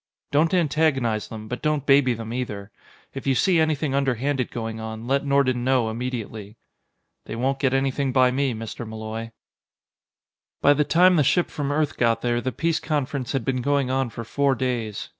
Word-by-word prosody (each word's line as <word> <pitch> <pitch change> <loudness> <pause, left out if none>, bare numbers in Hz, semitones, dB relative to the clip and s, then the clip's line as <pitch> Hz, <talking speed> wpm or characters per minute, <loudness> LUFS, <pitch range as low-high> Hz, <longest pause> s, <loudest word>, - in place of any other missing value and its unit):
Don't 155 +3 +3
antagonize 145 - +1
them, 110 -1 -8
but 125 +2 -5
don't 150 -2 0
baby 135 -3 +4
them, 115 0 -6
either. 105 -5 -5 0.4
If 135 0 -6
you 135 - +3
see 175 +6 +3
anything 155 -3 +1
underhanded 135 -1 0
going 115 -1 -5
on, 110 0 -6
let 135 +2 +1
Nordon 140 -3 +2
know 125 -3 +2
immediately." 110 -3 -5 0.7
"They - - -5
won't 135 +3 -1
get 135 -2 +1
anything 135 0 0
by 130 -1 +4
me, 135 -2 0
Mr. 115 +2 -6
Malloy." 110 +1 -6 1.3
By 145 - +5
the 150 +1 +2
time 180 +4 +4
the 150 - +4
ship 170 +6 +2
from 145 -1 -3
Earth 150 0 0
got 115 -1 +1
there, 120 0 +1
the 130 - -2
peace 165 +4 0
conference 140 -4 -2
had 135 -4 -1
been 130 -2 0
going 140 -1 +1
on 130 -1 0
for 115 +1 -7
four 140 +3 +1
days. 120 -5 -3
130 Hz, 180 wpm, -24 LUFS, 115-140 Hz, 1.3 s, By